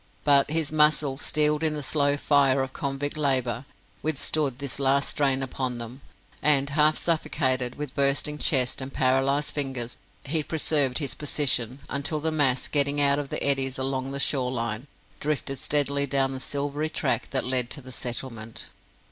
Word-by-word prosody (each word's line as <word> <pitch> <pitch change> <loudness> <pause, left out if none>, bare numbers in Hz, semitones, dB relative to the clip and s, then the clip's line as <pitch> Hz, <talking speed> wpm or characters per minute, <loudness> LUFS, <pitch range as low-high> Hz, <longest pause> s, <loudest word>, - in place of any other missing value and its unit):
But 140 -1 +4
his 155 -1 +1
muscles, 150 -2 +2
steeled 150 0 +3
in 155 -1 0
the 150 - -5
slow 145 0 +2
fire 140 -2 +3
of 130 0 -7
convict 140 +1 -3
labour, 130 -4 0 0.4
withstood 150 -3 0
this 140 -1 -4
last 140 +1 +1
strain 135 -2 +1
upon 130 -1 -3
them, 120 +3 -8 0.4
and, 140 -2 +3
half 155 +1 +3
suffocated, 130 -6 0
with 150 -3 -6
bursting 140 +2 +1
chest 130 -3 +2
and 130 +1 -6
paralysed 135 +3 +1
fingers, 130 -5 -3 0.2
he 155 +3 -1
preserved 145 -4 +2
his 140 -6 -2
position, 135 -4 -1
until 140 +2 -1
the 160 +2 -2
mass, 140 -5 +1
getting 145 0 +1
out 140 0 +3
of 140 -2 -5
the - - -2
eddies 135 -2 +1
along 130 0 -2
the 140 0 -4
shore 130 -2 +1
line, 115 +1 -3 0.3
drifted 140 -2 -3
steadily 140 -1 +2
down 135 -1 +1
the 135 - -5
silvery 145 +3 -2
track - - -1
that 135 - -1
led 125 -1 +1
to 145 - -4
the 130 - -11
settlement. 120 -2 -5
140 Hz, 165 wpm, -25 LUFS, 130-150 Hz, 0.4 s, But